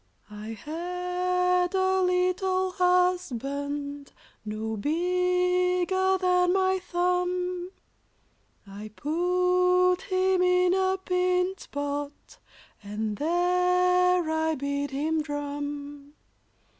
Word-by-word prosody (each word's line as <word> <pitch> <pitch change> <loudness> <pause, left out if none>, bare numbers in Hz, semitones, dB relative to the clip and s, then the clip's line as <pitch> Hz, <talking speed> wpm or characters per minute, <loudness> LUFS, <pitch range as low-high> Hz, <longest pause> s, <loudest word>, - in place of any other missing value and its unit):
] - - -28
I 225 +1 -6
had 360 - -1
a 375 0 +2
little 365 +1 +1
husband, 290 - -1 0.3
No 215 +1 -4
bigger 360 - +1
than 360 -1 +2
my 380 0 +2
thumb; 360 0 -1 1.0
I 205 +2 -9
put 360 - +2
him 370 0 +2
in 360 0 +3
a 380 0 +1
pint 365 0 -1
pot, 285 0 -5 0.4
And 210 +1 -4
there 360 +1 +2
I 320 0 0
bid 280 0 -3
him 310 +4 -1
drum. 290 -1 -6
360 Hz, 85 wpm, -26 LUFS, 290-365 Hz, 1.0 s, in